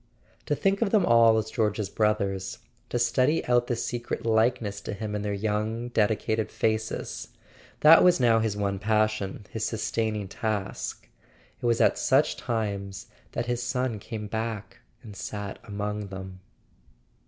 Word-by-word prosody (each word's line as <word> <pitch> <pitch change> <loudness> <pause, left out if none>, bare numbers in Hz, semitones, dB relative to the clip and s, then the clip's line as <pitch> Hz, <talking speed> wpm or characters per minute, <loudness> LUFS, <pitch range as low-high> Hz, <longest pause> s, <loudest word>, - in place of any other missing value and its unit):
To 145 - +1
think 195 +6 +1
of 225 - +2
them 200 -3 +3
all 115 -1 +6
as 110 0 -2
George's 105 -3 0
brothers, 100 -3 0 0.3
to - - -1
study 130 +5 +2
out 120 0 +3
the 120 - 0
secret 120 0 -3
likeness 110 -2 +1
to - - -5
him 105 +1 -4
in 105 - -2
their 105 0 -2
young 110 +3 -1
dedicated 110 -1 +1
faces: 110 0 -2 0.5
that 160 +2 +9
was 180 -4 +5
now 115 -3 +4
his 110 -2 -1
one 100 -1 -1
passion, 110 -1 0
his 110 - -3
sustaining 110 -2 -1
task; 105 -1 -3 0.5
it - - -4
was 115 -1 +2
at - - +3
such 135 +4 +3
times 100 -5 -3 0.2
that 115 - -1
his 120 0 -1
son 125 -2 -1
came 105 +1 -6
back 110 +1 -4 0.2
and 105 -4 -10
sat 100 0 -5
among 105 0 -4
them. 95 -1 -8
110 Hz, 155 wpm, -27 LUFS, 105-120 Hz, 0.5 s, that